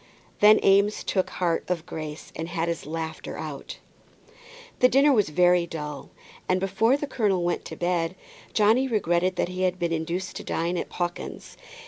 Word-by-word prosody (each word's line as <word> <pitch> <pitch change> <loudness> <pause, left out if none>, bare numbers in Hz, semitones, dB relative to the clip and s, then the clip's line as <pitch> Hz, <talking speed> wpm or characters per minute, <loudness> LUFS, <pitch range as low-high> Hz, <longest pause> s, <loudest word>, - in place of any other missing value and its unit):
Then 210 +1 +7
Eames 200 +2 +4
took 185 -2 0
heart 170 -2 -1
of 170 -2 -2
grace 155 -1 -7
and 160 - -4
had 170 -1 -1
his 170 -3 -3
laughter 160 0 -5
out. 150 -3 -7 1.0
The 250 - +6
dinner 275 +3 +5
was 210 -9 +2
very 175 +2 +3
dull, 150 -3 -6 0.4
and 185 0 +3
before 210 +7 +2
the 290 - -3
colonel 210 -9 0
went 175 0 -1
to - - -7
bed 175 0 -1 0.4
Johnny 225 +5 +3
regretted 185 -5 +1
that 175 - -1
he 185 0 -5
had 185 -1 +1
been 170 -2 -1
induced 170 +3 -3
to - - -7
dine 170 +2 -1
at - - -3
Pawkins's. 175 -1 -5
180 Hz, 170 wpm, -26 LUFS, 165-200 Hz, 1.0 s, Then